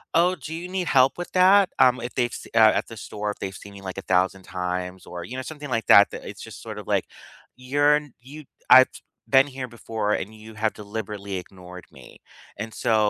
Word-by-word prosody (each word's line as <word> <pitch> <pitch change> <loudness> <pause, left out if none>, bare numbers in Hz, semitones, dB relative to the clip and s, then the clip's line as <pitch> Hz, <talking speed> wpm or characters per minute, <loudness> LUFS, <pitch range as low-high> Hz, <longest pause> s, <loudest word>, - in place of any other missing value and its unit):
"Oh, 175 +2 +4
do 160 - -8
you 175 +2 -6
need 185 -2 -2
help 130 -1 +4
with 175 - -6
that?" 190 +1 +5
Um, 125 -1 +5
If 120 - -6
they've 120 -2 0
see - - -8
uh, 110 -1 +7
at - - -7
the 115 - -10
store, 105 +1 -5
if - - -10
they've 95 -1 -5
seen 100 0 -12
me, 100 - -11
like, 95 0 -7
a - - -6
thousand 95 +1 +2
times 90 0 -4
or, 85 -1 -7
you 125 - -8
know, 130 - -4
something 145 -1 -8
like 115 -2 -1
that 100 - +8
that - - -8
it's - - -9
just - - -10
sort - - -7
of - - -11
like, - - +1 0.5
you're 145 +3 +3
n 150 -4 -9
you 145 +3 -11 0.3
I've 130 0 +9 0.4
been 135 +1 +5
here 130 -2 -6
before, 110 -2 -3
and 105 +3 -3
you 110 0 -13
have 110 +1 0
deliberately 105 -1 -6
ignored 90 0 -11
me. - - -14 0.5
And 110 0 -6
so 115 -3 +1
115 Hz, 230 wpm, -24 LUFS, 100-135 Hz, 0.5 s, I've